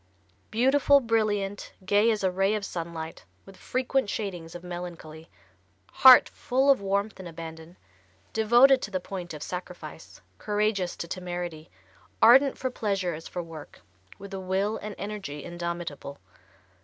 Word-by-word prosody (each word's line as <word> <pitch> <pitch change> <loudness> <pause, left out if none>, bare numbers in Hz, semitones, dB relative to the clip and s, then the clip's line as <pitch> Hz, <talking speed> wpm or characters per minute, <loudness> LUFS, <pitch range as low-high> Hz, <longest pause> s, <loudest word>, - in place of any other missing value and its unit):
Beautiful, 270 +5 +4
brilliant, 215 -4 -1
gay 205 +4 +4
as 215 -3 0
a 190 - +2
ray 195 +3 +1
of 210 -1 -3
sunlight, 165 - -6 0.2
with 195 - -14
frequent 255 -1 -1
shadings 175 -7 -5
of 175 - -8
melancholy; 170 -3 -8 0.6
heart 260 -2 +8
full 265 +3 +1
of 270 - +2
warmth 200 +1 -1
and 185 - -7
abandon; 160 +1 -10 0.6
devoted 240 +5 +5
to - - -4
the 190 -2 -2
point 180 -1 -7
of 150 -2 -7
sacrifice; 175 -3 -8 0.2
courageous 210 -3 -1
to 170 - -6
temerity; 175 -3 -5 0.5
ardent 265 +4 +6
for 260 - -3
pleasure 195 -7 -1
as 160 +1 -8
for 175 - -5
work; 160 -3 -11 0.4
with 200 0 -10
a 195 - -4
will 190 +3 -1
and 210 -1 -7
energy 200 -8 -6
indomitable. 170 -5 -5
195 Hz, 145 wpm, -27 LUFS, 170-215 Hz, 0.6 s, heart